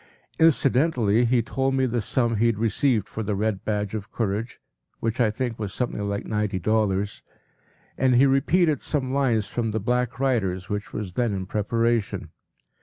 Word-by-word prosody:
p> 160 - +6
Incidentally 125 -6 +3
he 120 0 +2
told 135 +2 -1
me 130 -1 +2
the 120 -1 -1
sum 115 +1 0
he 115 +3 +3
had 115 -3 +1
received 115 0 +1
for 110 - -5
“The 105 -1 -1
Red 105 -1 -1
Badge 105 -2 -2
of 105 -2 -5
Courage,” 110 +1 -3 0.4
which 115 +2 -1
I 115 - +4
think 115 +1 -3
was 105 -2 -4
something 120 -4 -2
like 100 0 -3
ninety 105 -2 -1
dollars, 100 0 0 0.8
and 130 -1 +3
he 130 +3 +6
repeated 150 +4 +2
some 130 -4 -2
lines 120 -7 +2
from 115 +1 -2
“The 110 +1 -1
Black 125 +3 -1
Riders,” 95 -9 0
which 105 0 -4
was 100 -4 -5
then 115 -1 0
in 95 -1 -4
preparation. 105 -3 -1
115 Hz, 180 wpm, -24 LUFS, 105-125 Hz, 0.8 s, p>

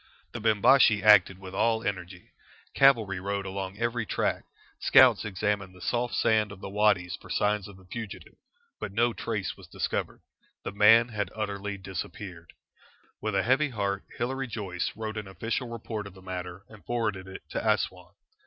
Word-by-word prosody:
The - - -6
Bimbashi 110 0 +5
acted 105 -3 +6
with 95 -1 -10
all 110 +3 +1
energy. 90 -3 -5 0.4
Cavalry 115 -9 +4
rode 100 +1 -3
along 95 0 -5
every 120 +1 -1
track; - - -1 0.3
scouts - - +6
examined 100 -1 -2
the - - -14
soft 120 +5 -1
sand 110 -2 +2
of 100 - -10
the 95 - -7
wadys 100 -3 +2
for - - -14
signs 105 -2 0
of 100 -2 -12
the 95 - -18
fugitive, 110 +3 -8 0.5
but - - -5
no 115 +3 +2
trace - - -3
was - - -14
discovered. - - -3 0.4
The - - -4
man 115 +4 +6
had 105 -5 -2
utterly 100 -1 -3
disappeared. 95 -2 -7 0.7
With 110 -2 -2
a 95 - +2
heavy 140 +5 +3
heart, 100 -4 -2
Hilary 135 +2 -2
Joyce 95 -6 -3
wrote 110 0 -5
an 105 -2 -5
official 115 +6 -3
report 110 -3 -5
of 100 - -13
the 95 - -14
matter 90 +1 -6
and 105 -2 -15
forwarded 110 -6 -2
it 95 - -9
to - - -1
Assouan. 90 0 -1
105 Hz, 170 wpm, -28 LUFS, 95-110 Hz, 0.7 s, acted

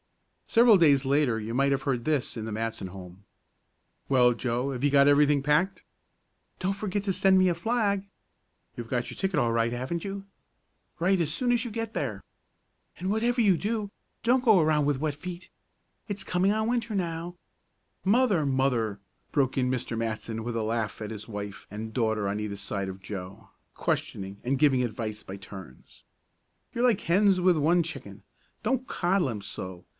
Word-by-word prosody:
Several 230 -2 +6
days 140 -6 +4
later 135 -4 +2
you 110 +1 -5
might 140 +2 +2
have 135 -1 0
heard 130 -4 -1
this 150 -3 0
in 115 - -4
the 110 - -5
Matson 110 -2 -3
home. 90 0 -11 0.9
"Well, 125 -2 +5
Joe, 125 +3 -2
have 130 0 -5
you 145 - +4
got 140 0 +5
everything 145 0 +4
packed?" 150 +7 +1 0.8
"Don't 190 +1 0
forget 200 0 -3
to 195 -2 0
send 190 +1 +4
me 185 0 +5
a 175 - +3
flag." 200 +1 0 0.7
"You've 120 -1 -7
got 125 -1 -1
your - - -7
ticket 190 -2 0
all 115 -1 +1
right, 115 0 +1
haven't 130 +8 -3
you?" 195 0 -5 0.7
"Write 185 +2 +2
as 155 -2 0
soon 245 +9 +1
as 240 0 +2
you 240 - -5
get 225 0 -4
there." - - -3 0.8
"And 185 - -3
whatever 235 +4 +1
you 205 -5 +5
do, 210 +2 -2 0.3
don't 245 +2 +3
go 220 -6 +6
around 155 -2 +3
with 145 -2 +1
wet 150 -1 -1
feet. 175 +3 -8 0.6
It's 200 -1 -3
coming 185 +1 +1
on 220 +1 0
Winter 235 -2 -1
now 170 -1 -3 0.3
" - - -47 0.2
"Mother! 200 - +2
Mother!" 125 -6 0 0.3
broke 135 -3 +1
in 125 -1 +2
Mr. 125 -2 -2
Matson, 115 0 -3
with 120 0 -3
a 110 - -1
laugh 110 0 -2
at 105 0 -5
his 105 0 -6
wife 100 -2 -6
and 110 +2 -6
daughter 110 -3 0
on 100 +1 -2
either 105 -1 -4
side 100 0 -3
of 95 0 -8
Joe, 95 0 -8 0.2
questioning 100 +1 -3
and 130 +2 0
giving 135 -4 +4
advice 110 -2 -4
by 95 - -8
turns. 95 -8 -12 0.7
"You're 235 - -1
like 240 -6 +3
hens 190 +2 +3
with 180 -1 +4
one 165 +3 +3
chicken. 165 - -8 0.4
Don't 260 -1 0
coddle 175 -4 +1
him 105 -4 -4
so. 95 -2 -7
140 Hz, 185 wpm, -27 LUFS, -, 0.9 s, Several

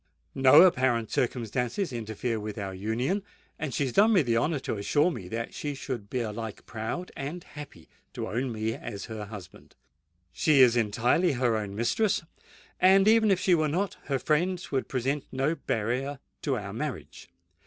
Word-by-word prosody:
No 135 +5 +7
apparent 130 - +2
circumstances 125 - -1
interfere 115 0 -3
with 105 0 -6
our 100 -2 -4
union; 115 - -1 0.4
and 150 -2 -3
she 140 - 0
has 130 -3 -2
done 215 +3 +5
me 185 -6 +5
the 120 -3 0
honour 150 +7 +1
to 110 - -3
assure 145 - +2
me 100 - -7
that 115 +4 -4
she 145 -1 -4
should 120 -7 -5
be 125 - -1
alike 110 -1 -5
proud 115 +11 -5
and 155 +6 -5
happy 145 - -11 0.3
to - - -4
own 125 +3 -2
me 110 0 -2
as 100 -3 -7
her 110 -2 -6
husband. 100 -4 -11 0.6
She 150 -4 +4
is 120 -2 +6
entirely 120 - +2
her 120 -3 +1
own 105 -2 -3
mistress; 170 - +1 0.6
and, 195 +2 +6
even 220 0 +5
if 190 -2 +3
she 185 0 +3
were 155 -2 +3
not, 185 +6 -1
her 140 -2 0
friends 175 +6 0
would 135 -2 -1
present 135 +2 -1
no 135 +4 0
barrier 135 0 -2 0.2
to 135 -4 0
our 100 -2 -6
marriage. 140 -5 -6
130 Hz, 175 wpm, -28 LUFS, 110-155 Hz, 0.6 s, No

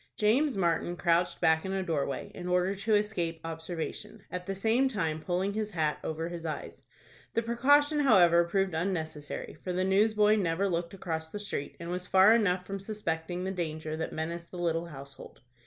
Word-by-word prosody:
James 245 +5 +2
Martin 175 -1 0
crouched 170 0 +1
back 160 0 +4
in 190 - -3
a 190 -1 -1
door 160 -6 0
way, 140 - -5
in 180 - -7
order 180 +2 +2
to 210 +2 +1
escape 180 -6 -1
observation, 165 0 -5
at 180 0 -5
the 195 - -2
same 225 +7 +2
time 165 -10 -2
pulling 185 +4 -1
his 215 0 -2
hat 155 -6 -1
over 160 +1 -3
his 170 -1 -6
eyes. 160 -2 -5 0.5
The 230 - +2
precaution, 285 +6 +3
however, 175 -11 +6
proved 195 +1 0
unnecessary, 160 -4 -3
for 185 - -3
the 180 +1 0
newsboy 210 +2 +4
never 185 0 +1
looked 170 0 -2
across 160 -4 -4
the 205 - -6
street, 205 -8 -4
and 170 0 -5
was 180 0 -4
far 190 +3 +7
enough 185 -5 +2
from 195 +1 -4
suspecting 180 -4 -3
the 190 - -2
danger 155 -3 -3
that 160 - -3
menaced 170 +2 -4
the 180 - -9
little 170 -1 -1
household. 140 -3 -11
180 Hz, 190 wpm, -30 LUFS, 165-200 Hz, 0.5 s, far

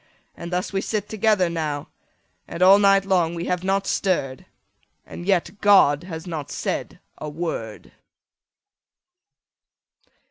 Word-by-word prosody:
And 170 +1 -8
thus 180 +2 -2
we 195 - 0
sit 210 -1 -3
together 215 -4 +2
now, 155 -4 -3 0.6
And 170 +2 -2
all 195 +2 +7
night 195 -1 +4
long 175 -3 +1
we 170 +1 -4
have 180 0 -2
not 195 +1 0
stirr'd, 140 -11 -1 0.6
And 175 - -9
yet 195 +1 0
God 175 -7 +5
has 165 -2 -7
not 160 -5 -5
said - - -4 0.2
a 150 - -5
word! 145 -9 -6
180 Hz, 130 wpm, -23 LUFS, 160-195 Hz, 0.6 s, all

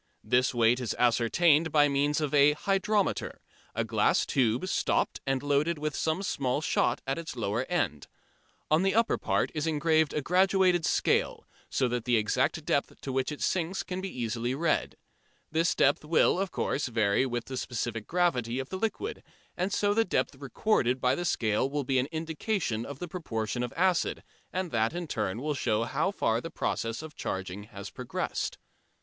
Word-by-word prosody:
This 125 +1 +2
weight 120 0 +3
is 125 -3 -2
ascertained 145 +7 +3
by 145 -1 +5
means 145 +1 +1
of 150 -2 -2
a 145 0 +6
"hydrometer," 195 +4 0 0.4
a - - +1
glass - - +2
tube, 125 +5 +1
stopped, - - 0
and 135 0 0
loaded 145 +3 +1
with 150 -1 -3
some 160 +5 -1
small 135 -7 -1
shot 155 - +1
at 135 +3 -1
its 165 -4 -6
lower 115 +1 -1
end. 145 - -1 0.6
On 155 +2 +5
the 195 +1 +1
upper 230 0 +2
part - - 0
is 155 0 -2
engraved 160 0 +2
a 150 - -1
graduated 185 0 +3
scale, - - +1 0.2
so 130 - +1
that 120 -1 -2
the 120 -2 +3
exact 105 -1 0
depth - - -1
to 135 - -4
which 130 +2 0
it 150 - -7
sinks 180 +1 0
can 185 0 -4
be 195 - -4
easily 120 -2 -2
read. 160 +2 0 0.6
This 165 +1 +2
depth 140 +2 +3
will, 160 +3 +3
of 195 0 -1
course, 145 -4 -1
vary 110 +1 +2
with 120 -1 -3
the 130 - -6
specific 120 -3 -3
gravity 130 -10 +1
of 135 0 -4
the 190 - -4
liquid, 225 - -3 0.3
and 185 +3 -1
so 205 +1 +2
the 225 +2 +3
depth 185 - 0
recorded 135 - 0
by 125 0 +2
the 175 +6 -2
scale 115 -3 +1
will 145 0 -2
be 130 0 +1
an 130 - 0
indication 160 - -2
of 140 - -7
the 175 - -5
proportion 120 - -3
of 120 -1 -3
acid, 180 0 +1 0.3
and 185 -2 -3
that 115 +3 +1
in 175 0 -3
turn 110 -4 -3
will 150 0 0
show 115 -5 0
how 140 +9 0
far 115 - 0
the 165 - -6
process 115 -2 -2
of 160 -1 -9
charging 95 +1 -4
has 100 -2 -9
progressed. 125 -1 -3
145 Hz, 185 wpm, -29 LUFS, 120-170 Hz, 0.6 s, a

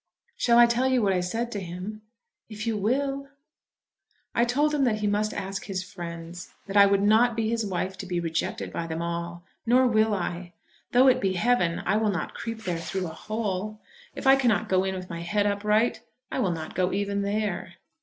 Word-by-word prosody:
"Shall 235 -1 +3
I 240 - +9
tell 235 +2 +1
you 260 -1 +3
what 200 -4 +2
I 180 - +1
said 230 +7 -2
to 205 - -3
him?" 185 +4 -6 0.5
"If 215 0 -6
you 225 -1 0
will." 275 +6 -1 1.1
"I 235 - +3
told 290 +5 +1
him 290 -2 +2
that 230 -4 +2
he - - 0
must 210 +1 +1
ask 195 0 -4
his 190 -2 -3
friends; 175 -2 -8
that 200 - -7
I 200 -1 +8
would 200 0 +2
not 220 +3 +4
be 225 -1 0
his 230 -1 0
wife 190 0 -3
to 190 - -6
be 175 -1 -1
rejected 165 -1 -3
by 165 - -3
them 165 +1 -3
all. 170 0 -4 0.2
Nor 250 +2 +4
will 220 -3 +3
I. 175 -1 -4 0.4
Though 255 +2 +6
it 255 -1 +4
be 190 -1 +1
heaven 180 -4 +1
I 210 - +2
will 220 -1 +1
not 185 -3 -3
creep 225 -1 -6
there 175 -4 -2
through 185 +3 -3
a - - -4
hole. 215 +1 -3 0.4
If - - -7
I 270 0 +8
cannot 240 -8 +1
go 185 0 +3
in 190 0 -2
with 185 -1 -6
my 170 - -5
head 205 +4 0
upright, 210 +3 +1 0.3
I - - -2
will 200 - +2
not 160 -2 -5
go 185 0 +1
even 200 0 -1
there." 200 -4 -2
205 Hz, 215 wpm, -26 LUFS, 180-230 Hz, 1.1 s, I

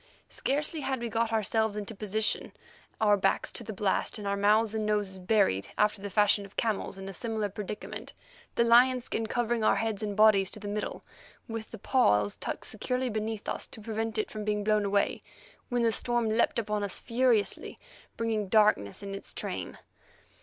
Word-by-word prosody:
Scarcely 300 +3 -1
had 270 -3 -2
we 235 0 -3
got 225 0 0
ourselves 220 0 +1
into 210 +2 -5
position, 215 +1 -1 0.5
our 210 -2 +5
backs 195 - 0
to - - +1
the 220 - -6
blast 200 +1 0
and 205 -1 -5
our 200 - +1
mouths 210 +2 +3
and 220 -1 -1
noses 205 -3 -1
buried 185 - +2
after 210 -1 +2
the 200 - -4
fashion 205 +1 +3
of 200 0 -14
camels 215 -3 -1
in 195 0 -7
a 195 - -6
similar 220 0 -2
predicament, 210 +1 -6 0.4
the 235 - +4
lion 245 +2 +6
skin 225 -2 -3
covering 240 0 0
our - - +4
heads 220 -2 -1
and 205 -1 -3
bodies 210 -3 +5
to - - -9
the 205 - -7
middle, 205 +1 -4 0.4
with 225 -2 -5
the - - -8
paws 105 - +2
tucked - - -5
securely 250 +3 -2
beneath 215 0 -3
us - - -3
to - - -10
prevent 220 +1 -2
it 215 - -1
from 215 -1 -5
being 210 0 -1
blown 210 0 +2
away, 200 0 +1 0.5
when 245 -1 +1
the 230 - +3
storm 240 0 0
leaped 225 +2 +2
upon 210 -2 -1
us 200 - -2
furiously, 235 -3 +1 0.4
bringing 220 -3 -1
darkness 205 - +3
in 200 0 -5
its 195 - -7
train. - - -5
215 Hz, 190 wpm, -29 LUFS, 205-225 Hz, 0.5 s, lion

